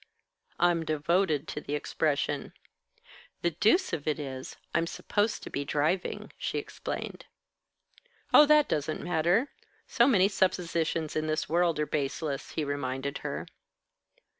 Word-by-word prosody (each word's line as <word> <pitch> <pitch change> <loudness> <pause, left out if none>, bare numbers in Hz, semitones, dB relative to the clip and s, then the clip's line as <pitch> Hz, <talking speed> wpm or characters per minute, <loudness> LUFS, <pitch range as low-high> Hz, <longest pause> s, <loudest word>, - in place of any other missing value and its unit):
"I'm 175 -1 +3
devoted 155 0 +1
to 150 - -4
the 145 - -3
expression." 145 -1 -1 0.9
"The 170 - +2
deuce 220 - +3
of 145 - -3
it 155 - +1
is, 130 -3 -6 0.2
I'm 170 0 +1
supposed 205 +5 -1
to - - -8
be 140 - -2
driving," 155 +6 -1
she - - -2
explained. - - -5 1.1
"Oh, 300 - +9
that 300 -1 +6
doesn't 155 +1 -2
matter. 175 - +2 0.3
So 240 -1 +3
many 195 -8 +5
suppositions 170 -5 0
in 155 0 0
this 155 0 -1
world 170 -1 +2
are 150 - +2
baseless," 145 -1 -2
he 160 - -1
reminded 140 -1 -3
her. - - -4
160 Hz, 135 wpm, -29 LUFS, 145-180 Hz, 1.1 s, Oh